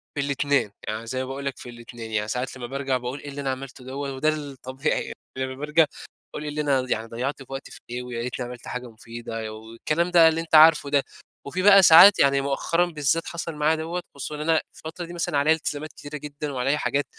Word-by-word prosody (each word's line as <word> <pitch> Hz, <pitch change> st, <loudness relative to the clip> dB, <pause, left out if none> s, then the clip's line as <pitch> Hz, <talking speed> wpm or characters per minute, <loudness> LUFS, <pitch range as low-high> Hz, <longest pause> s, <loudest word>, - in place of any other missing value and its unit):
في -, -, -3 dB
الاتنين 140 Hz, -5 st, +1 dB, 0.2 s
يعني 110 Hz, +2 st, -4 dB
زي 130 Hz, +2 st, -3 dB
ما -, -, -5 dB
باقول 135 Hz, +1 st, -6 dB
لك 140 Hz, -2 st, -3 dB
في -, -, -10 dB
الاتنين، 120 Hz, -1 st, -10 dB
يعني 105 Hz, 0 st, -1 dB
ساعات 125 Hz, +3 st, -3 dB
لما 120 Hz, -1 st, -6 dB
بارجع 135 Hz, 0 st, -1 dB
باقول 125 Hz, +3 st, -5 dB
إيه 145 Hz, -, -8 dB
اللي 140 Hz, 0 st, -6 dB
أنا 135 Hz, -, -2 dB
عملتُه 130 Hz, -1 st, -6 dB
دوَّة 135 Hz, +1 st, -4 dB
وده 135 Hz, +4 st, +1 dB
الطبيعي 140 Hz, -2 st, -2 dB
يعني -, -, -7 dB, 0.2 s
لمَّا 130 Hz, 0 st, -3 dB
بارجع 150 Hz, +3 st, +3 dB, 0.5 s
باقول 150 Hz, -, -5 dB
إيه 150 Hz, -, -4 dB
اللي 150 Hz, +1 st, -2 dB
أنا 135 Hz, -3 st, +1 dB
يعني 110 Hz, +1 st, -1 dB
ضيَّعت 125 Hz, +5 st, -3 dB
وقتي 135 Hz, 0 st, -7 dB
في -, -, -11 dB
إيه، 125 Hz, +1 st, -4 dB
ويا 120 Hz, -1 st, -5 dB
ريتني 125 Hz, +1 st, -4 dB
عمَلت 120 Hz, 0 st, -9 dB
حاجة 125 Hz, -1 st, -5 dB
مفيدة 115 Hz, -1 st, -7 dB
والكلام 115 Hz, +11 st, -2 dB
ده 170 Hz, -2 st, +7 dB
اللي 160 Hz, 0 st, +1 dB
أنت 165 Hz, -1 st, 0 dB
عارفُه 155 Hz, -2 st, +7 dB
ده، 140 Hz, -1 st, +3 dB, 0.4 s
وفيه 185 Hz, +6 st, -3 dB
بقى 200 Hz, -1 st, +8 dB
ساعات، 175 Hz, +5 st, +9 dB
يعني 140 Hz, 0 st, +4 dB
مؤخرًا 140 Hz, +5 st, +1 dB
بالذات 160 Hz, -1 st, 0 dB
حصل 170 Hz, -1 st, -5 dB
معايا 150 Hz, +2 st, +2 dB
دوَّة 165 Hz, +3 st, -4 dB
خصوصًا 145 Hz, +2 st, -5 dB
إن 150 Hz, -, -6 dB
أنا 160 Hz, -, +4 dB
الفترة 165 Hz, +2 st, -7 dB
دي 170 Hz, -, -10 dB
مثلًا 165 Hz, -4 st, -1 dB
عليَّا 150 Hz, +3 st, +4 dB
التزامات 155 Hz, -1 st, -4 dB
كتيرة 145 Hz, +1 st, -8 dB
جدًا، 150 Hz, 0 st, -6 dB
وعليَّا 135 Hz, +3 st, 0 dB
حاجات 145 Hz, 0 st, 0 dB
140 Hz, 225 wpm, -24 LUFS, 125-155 Hz, 0.5 s, ساعات